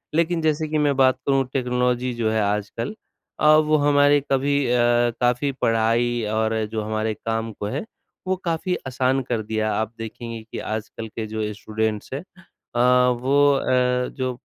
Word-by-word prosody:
लेकिन 170 +1 +1
जैसे 155 0 0
कि 155 - 0
मैं 145 -2 +2
बात 130 -1 +4
करूँ 135 -1 +3
टेक्नोलॉजी 125 -1 0
जो 115 -2 -1
है 110 0 +1
आजकल 105 - -2 0.4
अ, - - +1
वो 155 0 +3
हमारे 145 0 +4
कभी 140 +1 +2
अ, 120 - +2 0.5
काफ़ी 125 +3 +2
पढ़ाई 115 +1 +1
और 110 0 0
जो 110 -1 -2
हमारे 110 +1 -1
काम 115 +1 -3
को 105 - -6
है, 130 - -3 0.4
वो 190 - +2
काफ़ी 170 +2 -1
आसान 130 +1 +1
कर 120 -3 0
दिया। 110 0 -1
आप 110 +1 -2
देखेंगे 115 +1 -7
कि - - -5
आजकल 110 +1 -5
के 110 +1 -5
जो 105 0 -3
स्टूडेंट्स 110 +2 -3
हैं 140 - -4 0.5
अ, - - 0 0.4
वो 140 +2 +4
अ, 125 -1 +1
जो 130 -1 -1
125 Hz, 165 wpm, -23 LUFS, 110-140 Hz, 0.5 s, बात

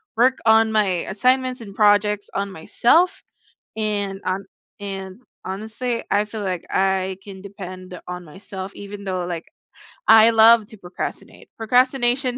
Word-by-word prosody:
work 255 +3 +3
on 220 0 +5
my 215 -1 +3 0.3
assignments 255 +4 +1
and 200 -4 -10
projects 205 -1 +3
on 200 0 -2
myself 235 - +2 0.6
and 205 -3 -2
on 190 +2 -1 0.4
and 195 +2 -7 0.2
honestly, 220 +5 -4
I 205 +1 +2
feel 215 0 -6
like 185 -3 -3
I 190 0 0
can 195 -2 -10
depend 185 -2 -9
on 180 0 -6
myself 190 +3 -8
even 200 0 -9
though, 185 -2 -2
like, 170 -2 -6 0.6
I 220 0 +8
love 225 -1 +6
to 220 - -14
procrastinate. 180 -2 -7
Procrastination 250 +2 +2
205 Hz, 135 wpm, -22 LUFS, 190-225 Hz, 0.6 s, I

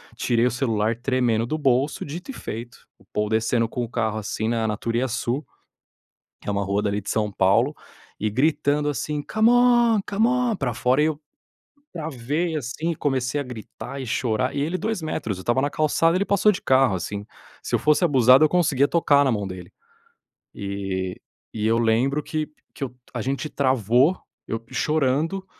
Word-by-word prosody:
Tirei 120 0 +1
o 125 - +2
celular 115 -3 0
tremendo 120 -3 +1
do 155 - -2
bolso. 135 0 +1
Dito 170 - -8
e - - -9
feito, 120 - -7 0.2
o - - -23
Paul 105 0 0
descendo 115 +1 +1
com 125 - -3
o 115 - -5
carro 110 -3 -1
assim 110 +1 -3
na 115 -1 0
na 105 - -1
Turiassu, 120 +3 -1 1.0
que - - -11
é - - +1
uma 100 0 -1
rua 100 +1 0
dali 105 0 -1
de 100 - -6
São 105 -1 0
Paulo, 115 +10 +3 0.5
e 110 - 0
gritando 145 +4 +1
assim: 150 0 -2
"C'mon, 235 +2 +4
c'mon!" 235 +2 +1
para 135 -7 -2
fora 125 +4 +2
e 155 - +3
eu, 155 -1 -2 0.7
travei 160 +1 -2
assim 150 +5 -3
e - - -6
comecei 135 0 -1
a - - -4
gritar 125 +3 -8
e 130 - -6
chorar, 125 +1 -1
e - - 0
ele 165 +6 -1
2 220 -4 -2
metros, 110 -10 -3
eu 95 - -8
estava 120 +5 +1
na 145 - +1
calçada 165 +2 +2
ele 195 - +1
passou 200 +1 +3
de 195 - -6
carro 130 -5 +3
assim, 100 +3 -5 0.4
se - - -4
eu - - +3
fosse 150 +4 +3
abusado 130 -2 +6
eu 155 - +4
conseguia 145 -6 +3
tocar 145 -4 +3
na 135 - +2
mão 105 -2 -1
dele. 90 -2 -9 0.8
Eh, 95 -2 -3 0.4
e 110 -1 -2
eu 115 +1 +3
lembro 125 +6 +1
que 155 -1 -3 0.3
que 145 - -5
eu 125 -1 -10 0.2
a 120 - -3
gente 140 +5 -2
travou, 130 - +2 0.3
eu 115 - -2
chorando, 155 +5 0
130 Hz, 185 wpm, -23 LUFS, 110-155 Hz, 1.0 s, abusado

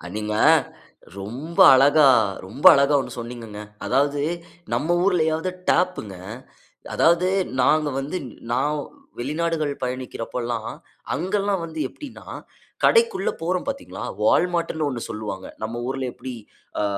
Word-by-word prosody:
நீங்க 105 0 -3 0.9
ரொம்ப 130 +12 -6 0.2
அழகா, 140 +2 +6 0.4
ரொம்ப 110 +9 -8
அழகா 140 +1 +3
ஒண்ணு - - -8
சொன்னீங்கங்க. 115 -3 -8 0.3
அதாவது 140 +2 +1 0.5
நம்ம 170 +3 +1
ஊர்லையாவது 160 -2 +1 0.2
டேப்ங்க. 175 - 0 0.8
அதாவது 170 +2 +3 0.3
நாங்க 155 -1 +3
வந்து 145 +7 -3 0.3
நான் 145 +4 0 0.4
வெளிநாடுகள் 155 +2 -1
பயணிக்கிறப்பலாம் 120 -2 -4 0.4
அங்கெல்லாம் 195 +1 -1
வந்து 160 -1 -8
எப்டின்னா, 290 -4 -11 0.6
கடைக்குள்ள 460 -5 +3
போறோம் 180 +2 -1
பாத்தீங்களா 275 0 -5 0.2
Wallmartன்னு 165 +4 +1
ஒண்ணு 125 -4 -4
சொல்லுவாங்க. 105 -3 -5 0.2
நம்ம 115 +2 -4
ஊர்ல 135 0 -2
எப்டி 130 -1 -7 0.5
அ, - - +1
145 Hz, 105 wpm, -23 LUFS, 125-170 Hz, 0.9 s, அழகா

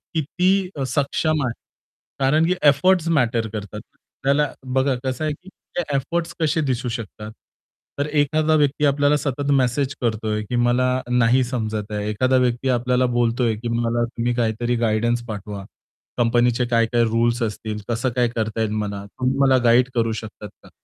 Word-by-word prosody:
किती 180 +5 +1 0.2
सक्षम 145 +3 0
आहे. 120 - -2 0.7
कारण 150 +4 +3
की 180 - +2 0.2
एफोर्ट्स 170 +4 +3
मॅटर 115 -3 +1
करतात. 105 0 -6 0.4
त्याला 140 +1 +2 0.2
बघा 130 0 +2
कसं 130 +3 -3
आहे, 155 - 0
की 180 +6 -14 0.3
ते 175 - +2
एफोर्ट्स 170 +5 -2
कसे 160 0 +1
दिसू 130 -3 -1
शकतात. 105 -1 -8 0.7
तर 145 - +1
एखादा 155 +1 +2
व्यक्ती 145 -1 +2
आपल्याला 145 +1 +3
सतत 145 0 -2
मेसेज 135 +1 +1
करतोय, 110 -2 -1
की 125 - -1
मला 120 +1 +2 0.2
नाही 125 +1 +3
समजत 110 -4 -3
आहे. 105 0 -2
एखादा 130 +5 +2
व्यक्ती 125 +1 +1
आपल्याला 125 +1 +2
बोलतोय, 120 -1 +1
की 115 +3 -6
"मला 115 0 0
तुम्ही 120 0 -2
काहीतरी 120 +1 0
गाईडन्स 120 +2 0
पाठवा 105 -2 -6 0.5
कंपनीचे 120 0 +2
काय-काय 115 0 +2
रुल्स 115 +1 +1
असतील, 110 0 -4
कसं 120 +2 0
काय 125 -1 +3
करता 110 -1 -3
येईल 110 -1 0
मला 100 -2 -3
तुम्ही 130 +6 -2
मला 135 -2 +5
गाईड 120 +2 +4
करू 115 -1 +1
शकतात 105 -1 -10
का?" - - -16
125 Hz, 160 wpm, -22 LUFS, 115-140 Hz, 0.7 s, मला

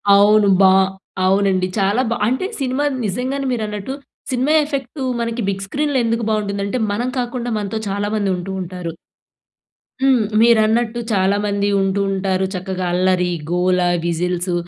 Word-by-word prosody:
అవును. 205 +1 +5
బ - - +6 0.6
అవునండి. 190 -1 +2
చాలా 200 +5 +2
బా 235 - 0
అంటే 260 +10 0 0.2
సినిమా 260 +2 0 0.2
నిజంగానే 255 +7 -2
మీరన్నట్టు. 215 0 -3 0.4
సినిమా 260 +4 +1
ఎఫెక్టు 275 -1 -4 0.2
మనకి 230 0 -2
బిగ్ 195 0 -3
స్క్రీన్‌లో 290 +4 -1
ఎందుకు 230 0 0
బాగుంటుందంటే, 200 0 -1
మనం 240 +5 -1
కాకుండా 245 0 -3
మనతో 210 +1 -3
చాలా 205 +1 -1
మంది 205 -2 0
ఉంటూ 180 +2 -6
ఉంటారు. 180 -1 -5 1.1
హ్మ్. 260 -5 +4
మీరన్నట్టు 230 +1 +3
చాలామంది 200 +1 +1
ఉంటూ 195 +1 +1
ఉంటారు. 190 -1 0
చక్కగా 185 0 -3
అల్లరి, 180 0 +2 0.2
గోల, 180 +1 +2 0.3
విజిల్సు 180 +1 -1
205 Hz, 130 wpm, -19 LUFS, 190-240 Hz, 1.1 s, బ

